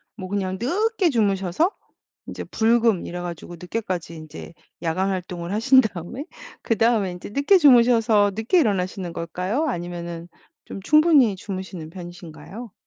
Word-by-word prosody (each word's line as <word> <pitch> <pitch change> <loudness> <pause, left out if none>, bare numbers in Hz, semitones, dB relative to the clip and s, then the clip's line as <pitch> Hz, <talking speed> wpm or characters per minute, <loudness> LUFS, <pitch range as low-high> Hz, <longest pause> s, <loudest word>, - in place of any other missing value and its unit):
뭐 185 -4 -8
그냥 190 -1 -2
늦게 400 - +1
주무셔서 205 - +1 0.6
이제 - - -6
불금 230 -3 +2
이래 175 - -6
가지고 175 0 -7
늦게까지 180 -2 -4
인제 155 +1 -10 0.3
야간 180 +4 0
활동을 180 -2 -4
하신 260 +5 +5
다음에 220 - -5 0.4
그 225 - -1
다음에 220 -5 +2
이제 180 - -9
늦게 280 - +4
주무셔서 235 - +5
늦게 225 - +2
일어나시는 190 - -1
걸까요? 180 - -2
아니면은 170 - -5 0.4
좀 - - -8
충분히 305 - +5
주무시는 185 -4 -7
편이신가요? 175 +5 -10
195 Hz, 340 characters per minute, -23 LUFS, 175-235 Hz, 0.6 s, 하신